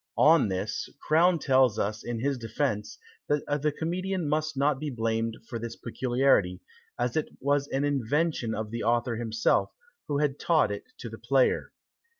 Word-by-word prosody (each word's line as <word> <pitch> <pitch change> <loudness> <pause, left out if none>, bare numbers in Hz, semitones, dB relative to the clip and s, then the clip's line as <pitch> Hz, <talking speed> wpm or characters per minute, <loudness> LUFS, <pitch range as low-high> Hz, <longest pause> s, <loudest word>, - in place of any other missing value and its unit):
On 155 -5 +6
this, 95 +3 -3
Crown 170 +3 +3
tells 130 -6 +3
us 105 +2 -2
in 120 -2 -4
his 140 0 0
defence, 105 - -2 0.3
that 145 0 0
the 150 +1 +1
comedian 180 +3 -2
must 155 0 -1
not 140 0 +2
be 150 0 -3
blamed 115 -2 -1
for 115 - -5
this 115 0 -6
peculiarity, 120 -7 +1 0.4
as 120 0 -1
it 155 - 0
was 140 +1 +1
an 135 0 -1
invention 145 -2 0
of 110 0 -4
the 115 - -3
author 115 +1 +1
himself, 110 -1 +1 0.4
who 145 -2 0
had 145 -1 0
taught 155 -11 +3
it 100 - -5
to - - -7
the - - -10
player. 460 -2 +2
135 Hz, 165 wpm, -28 LUFS, 115-150 Hz, 0.4 s, On